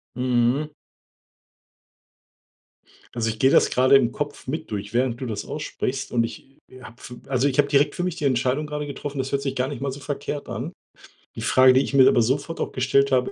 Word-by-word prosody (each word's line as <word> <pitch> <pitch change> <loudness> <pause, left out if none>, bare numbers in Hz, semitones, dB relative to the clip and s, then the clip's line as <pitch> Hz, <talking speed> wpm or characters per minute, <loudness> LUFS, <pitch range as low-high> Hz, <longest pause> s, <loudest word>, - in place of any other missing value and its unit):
Mhm. 125 +4 +1 2.4
Also 115 -2 -1
ich 110 0 -4
gehe 130 - +4
das - - +5
gerade 130 +2 +5
im 125 -3 +3
Kopf 145 +1 -5
mit 155 +4 -5
durch, 105 +1 -5
während 125 -1 0
du 130 - -4
das 105 -3 -4
aussprichst 135 -3 -4
und 115 -1 +2
ich, 115 - -7 0.2
äh, 130 - -14
habe 120 -1 -12 0.3
also 135 0 +1
ich 135 -1 -1
habe 145 -1 +4
direkt 140 +1 +2
für 175 - -3
mich 180 -2 -2
die 155 - -5
Entscheidung 130 +2 +1
gerade 150 0 -4
getroffen 140 0 -6
das 135 0 -3
hört 140 0 0
sich 135 -1 -2
gar 130 0 -1
nicht 145 - -7
mal 140 -1 -2
so 140 - -9
verkehrt 145 0 -5
an. - - -5 0.6
Die - - -6
Frage, 130 0 +5
die 130 - +4
ich 140 - -4
mir 130 -1 +7
aber 120 - +4
sofort 140 +8 -1
auch - - -2
gestellt 135 +2 +2
habe, 125 -1 +2
135 Hz, 210 wpm, -23 LUFS, 125-145 Hz, 2.4 s, mir